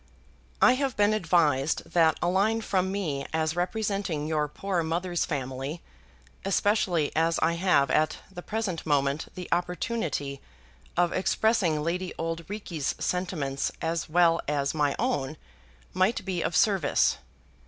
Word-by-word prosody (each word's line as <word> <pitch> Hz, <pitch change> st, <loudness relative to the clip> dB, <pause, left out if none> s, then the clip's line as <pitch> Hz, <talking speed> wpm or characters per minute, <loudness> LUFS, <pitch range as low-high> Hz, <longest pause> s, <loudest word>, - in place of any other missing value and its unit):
I 250 Hz, -, +8 dB
have 270 Hz, -3 st, -1 dB
been 205 Hz, +1 st, +4 dB
advised 160 Hz, -7 st, +2 dB
that 165 Hz, -2 st, +4 dB
a -, -, +2 dB
line 205 Hz, +5 st, +2 dB
from 190 Hz, -3 st, 0 dB
me 160 Hz, -9 st, -2 dB
as 160 Hz, 0 st, 0 dB
representing 195 Hz, -4 st, -1 dB
your 155 Hz, -1 st, 0 dB
poor 185 Hz, +4 st, -2 dB
mother's 175 Hz, +2 st, -1 dB
family, 135 Hz, +2 st, -4 dB, 0.6 s
especially 195 Hz, -5 st, +1 dB
as 165 Hz, +1 st, +2 dB
I 165 Hz, +1 st, +3 dB
have 170 Hz, -6 st, +2 dB
at 155 Hz, +3 st, +2 dB
the 175 Hz, -2 st, -8 dB
present 205 Hz, -5 st, -3 dB
moment 140 Hz, -1 st, +1 dB
the 180 Hz, -1 st, -6 dB
opportunity 175 Hz, -, -2 dB, 0.6 s
of 175 Hz, -1 st, +3 dB
expressing 185 Hz, -5 st, +1 dB
Lady 180 Hz, +3 st, -2 dB
Auld 165 Hz, 0 st, -4 dB
Reekie's 175 Hz, -8 st, -3 dB
sentiments 160 Hz, -7 st, -2 dB
as 165 Hz, 0 st, -2 dB
well 170 Hz, 0 st, +4 dB
as 140 Hz, -1 st, 0 dB
my 145 Hz, -2 st, +1 dB
own, 135 Hz, +2 st, -1 dB, 0.6 s
might 185 Hz, +3 st, +1 dB
be 185 Hz, -3 st, -2 dB
of -, -, -1 dB
service. 190 Hz, -9 st, +3 dB
170 Hz, 135 wpm, -27 LUFS, 150-190 Hz, 0.6 s, I